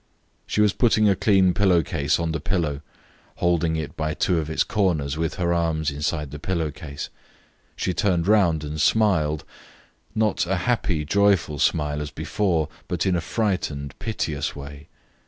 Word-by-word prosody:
She 105 - +1
was 105 -2 +4
putting 110 -3 +3
a 100 - +4
clean 95 -2 +3
pillow 90 -4 +3
case 75 -1 0
on 85 -1 -1
the 80 - -2
pillow, 75 -3 -1 0.5
holding 85 -2 +1
it 80 -2 -4
by 75 -1 -2
two 90 -3 +1
of 80 -1 -4
its 80 - +1
corners 80 -9 0
with 80 +1 -2
her 85 -2 0
arms 80 -3 0
inside 75 0 -2
the 75 - -7
pillow 85 -2 -1
case. 70 0 -7 0.7
She 90 - -1
turned 90 -2 +1
round 90 -8 +3
and 75 +1 -3
smiled, 80 -9 +2 0.7
not 110 -5 +1
a 95 - +1
happy, 100 -10 0
joyful 95 -4 +2
smile 75 0 +1
as 75 - -4
before, 80 +2 -1 0.2
but 90 -1 -1
in 95 -2 +2
a 85 - 0
frightened, 80 - -2
piteous 80 -9 -3
way. 70 +1 -9
80 Hz, 165 wpm, -24 LUFS, 75-95 Hz, 0.7 s, was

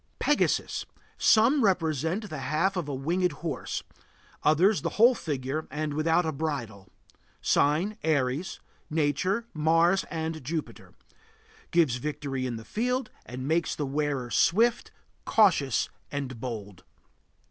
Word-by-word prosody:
PEGASUS. - - +1 0.3
Some 250 +5 +5
represent 175 - 0
the 155 -6 -6
half 155 +9 0
of 170 -5 -3
a 140 - -2
winged 175 +7 0
horse; 150 -6 -3 0.6
others 170 +3 +4
the - - -4
whole 235 +4 +7
figure 150 - -3
and 150 0 -3
without 160 +3 +2
a 160 - 0
bridle. 135 - -4 0.5
Sign: 175 +9 +1
Aries. 145 +1 0 0.3
Nature: 160 - 0
Mars 165 +4 +3
and 160 -2 -4
Jupiter. 155 +4 -5 0.7
Gives 160 -8 +3
victory 140 -1 -3
in 120 - -3
the 110 0 -8
field, 250 - -1 0.2
and 130 +2 -6
makes 165 +2 +1
the 150 - -2
wearer 140 -3 -2
swift, 230 +7 +3 0.3
cautious, 170 - +3 0.2
and 135 -4 -4
bold. 105 -7 -6
155 Hz, 125 wpm, -28 LUFS, 135-180 Hz, 0.7 s, whole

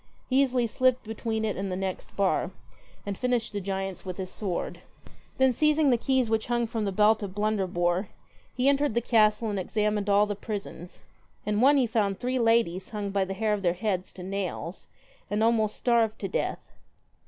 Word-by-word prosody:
He 265 +2 +5
easily 255 -3 +2
slipped 255 +2 +1
between 220 0 -3
it 215 - -1
and 195 0 -3
the - - -1
next 190 0 -4
bar, 195 -1 +1 0.6
and 200 -1 -3
finished 245 -1 -1
the 205 - -2
giants 195 0 -4
with 185 -2 -6
his 185 -1 -5
sword. 190 -5 -3 0.6
Then 265 -1 +4
seizing 305 +1 +3
the - - +5
keys 260 0 +1
which 220 0 0
hung 240 0 +1
from 225 -2 -3
the 200 - -1
belt 215 +3 +4
of 200 -2 -6
Blunderbpre, 190 -3 0 0.5
he 255 +1 +1
entered 280 -3 +2
the 235 - +2
castle 220 -1 +3
and 200 - -2
examined 210 +1 -1
all 205 +1 +5
the 205 - -2
prisons. 200 -4 -7 0.4
In 210 +1 0
one 285 +3 +6
he 260 - +4
found 205 -4 0
three 255 +1 -1
ladies 225 -6 +2
hung 205 -2 -4
by 195 -1 +1
the 195 +1 -5
hair 215 +1 +1
of 205 - -1
their 175 -3 +2
heads 190 -2 -2
to 180 - -9
nails, 190 -2 -4 0.4
and 210 +1 0
almost 220 -2 +2
starved 230 -3 +2
to - - -4
death. - - -3
210 Hz, 195 wpm, -27 LUFS, 195-235 Hz, 0.6 s, one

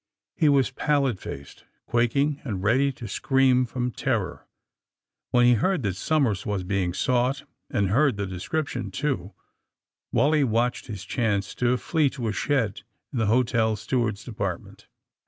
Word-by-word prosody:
He 155 -4 +3
was 135 -2 +3
pallid 135 -6 +1
faced, 70 0 -9 0.2
quaking 140 +5 +1
and 100 -8 -4
ready 130 +7 +3
to 120 -2 -8
scream, 130 +3 +3
from 125 +1 -2
terror. 110 -10 -2 0.8
When 120 0 +4
he 120 - +6
heard 175 - +1
that 95 -3 -1
Somers 120 - +1
was 100 -3 -2
being 95 -1 0
sought, 125 +7 0 0.3
and 100 -2 0
heard 130 +2 +3
the 100 - -1
description, 100 - -3
too, 120 - -3 0.8
Wally 150 +1 +3
watched 120 0 0
his 100 -4 -7
chance 105 -5 -1
to 125 0 +1
flee 155 +1 +1
to 120 -3 -2
a - - -2
shed 115 -8 0 0.3
in 125 - -1
the 110 - +1
hotel 115 -1 +2
steward's 110 -1 -1
depart 100 -7 -3
ment. - - -17
120 Hz, 155 wpm, -25 LUFS, 105-135 Hz, 0.8 s, he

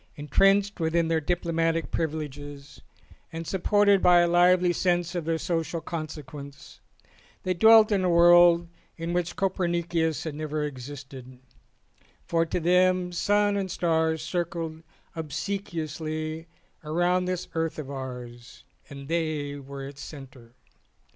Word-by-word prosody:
Entrenched 195 +8 +2
within 165 0 +1
their 160 -1 +1
diplomatic 165 0 -1
privileges 145 -2 -5 0.5
and 165 +1 -6
supported 200 +2 +3
by 175 -1 +6
a 175 - +3
lively 175 +1 +4
sense 175 -1 0
of 175 -3 -3
their 165 0 0
social 165 0 -2
consequence, 150 -3 -8 0.6
they 185 - 0
dwelt 220 +4 +6
in 195 -2 +2
a 180 - +2
world 175 0 +6 0.3
in 165 +1 -4
which 175 -1 -1
Copernicus 170 -4 -1
had 160 - -4
never 155 0 -3
existed, 135 -2 -8 0.9
for 165 0 +1
to 170 - -2
them 180 +1 +2
sun 205 +3 +1
and 195 -2 -2
stars 160 -3 0
circled 165 -1 -3 0.3
obsequiously 160 -1 -4 0.3
round 175 +3 0
this 180 -1 -3
earth 165 -1 -2
of 145 -3 -6
ours, 125 -3 -8 0.3
and 140 -1 -9
they 155 -3 -2
were 140 0 -8
its 140 0 -11
centre. 130 -5 -12
165 Hz, 125 wpm, -26 LUFS, 150-175 Hz, 0.9 s, by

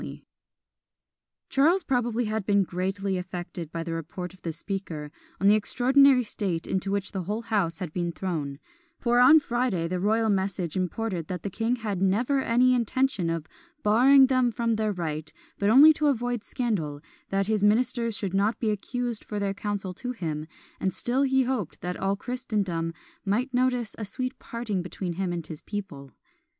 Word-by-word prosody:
" - - -64
Charles 330 +7 +4
probably 245 -2 0
had 215 0 -2
been 200 0 +3
greatly 190 +1 -2
affected 175 -2 -6
by 165 -1 -3
the 165 0 -4
report 175 +3 -5
of 185 - -19
the 165 - -3
Speaker, 165 -4 -5 0.3
on 195 - -1
the 205 - +7
extraordinary 255 +4 +4
state 190 -6 -2
into 190 +1 -2
which 200 -1 -1
the 190 -3 -4
whole 215 +5 -3
house 200 -8 0
had 175 -5 -5
been 175 -1 -1
thrown; 160 -7 -3 0.4
for 240 -1 +2
on 275 +6 +8
Friday 240 - -1
the 180 +1 -2
royal 220 +3 +2
message 190 -4 -1
imported 185 -2 -2
that 180 -2 -5
the 200 - -3
king 225 +5 0
had 210 -6 -3
never 235 +9 +2
any 250 +1 +4
intention 245 -6 +1
of 165 -2 -2 0.4
"barring 260 +6 +6
them 255 -2 +2
from 230 +1 0
their 215 -1 0
right, 155 -4 -4 0.3
but 200 - +2
only 285 +7 +9
to 300 0 0
avoid 245 -4 0
scandal, 175 - -2 0.3
that 195 0 +1
his 215 0 0
ministers 230 +1 +2
should 195 -3 -3
not 200 +4 +1
be 220 -2 +1
accused 240 +2 -3
for 210 - -5
their 200 -1 -1
counsel 200 -2 -3
to 250 +7 -5
him; 155 -8 -4 0.3
and 190 - 0
still 240 +8 0
he 265 -1 +3
hoped 245 - -3
that 180 0 -3
all 195 +1 0
Christendom 200 -8 -2 0.3
might 240 +7 0
notice 250 -3 +1
a 215 - -3
sweet 255 +6 -4
parting 230 -5 -3
between 180 0 -4
him 185 +1 -2
and 170 -2 -4
his 155 -3 -8
people." 190 -10 -6
205 Hz, 180 wpm, -27 LUFS, 180-240 Hz, 0.4 s, only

